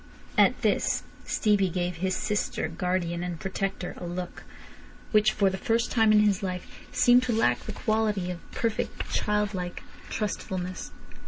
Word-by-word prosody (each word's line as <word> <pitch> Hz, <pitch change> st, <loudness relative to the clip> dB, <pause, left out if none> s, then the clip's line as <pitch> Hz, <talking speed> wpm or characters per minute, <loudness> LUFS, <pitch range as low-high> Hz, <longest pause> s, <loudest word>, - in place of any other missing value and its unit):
At -, -, +5 dB
this -, -, +2 dB, 0.2 s
Stevie 205 Hz, -4 st, +2 dB
gave 175 Hz, 0 st, -2 dB
his 185 Hz, +2 st, 0 dB
sister, 210 Hz, -5 st, -1 dB
guardian 175 Hz, +1 st, -1 dB
and 175 Hz, -2 st, -4 dB
protector 195 Hz, -1 st, -3 dB
a -, -, -6 dB
look, 175 Hz, 0 st, -5 dB, 0.7 s
which 215 Hz, 0 st, +5 dB
for 200 Hz, -3 st, +2 dB
the 190 Hz, -, -4 dB
first 230 Hz, +1 st, +1 dB
time 225 Hz, -2 st, +4 dB
in 210 Hz, 0 st, +6 dB
his 205 Hz, -2 st, +3 dB
life 185 Hz, -2 st, -5 dB
seemed 245 Hz, +1 st, +6 dB
to 250 Hz, -2 st, 0 dB
lack 120 Hz, -, +3 dB
the -, -, -7 dB
quality 210 Hz, -4 st, 0 dB
of 175 Hz, -, -6 dB
perfect 225 Hz, -2 st, -2 dB
childlike 205 Hz, -4 st, -1 dB, 0.3 s
trustfulness. 185 Hz, -3 st, -3 dB
190 Hz, 150 wpm, -27 LUFS, 180-215 Hz, 0.7 s, in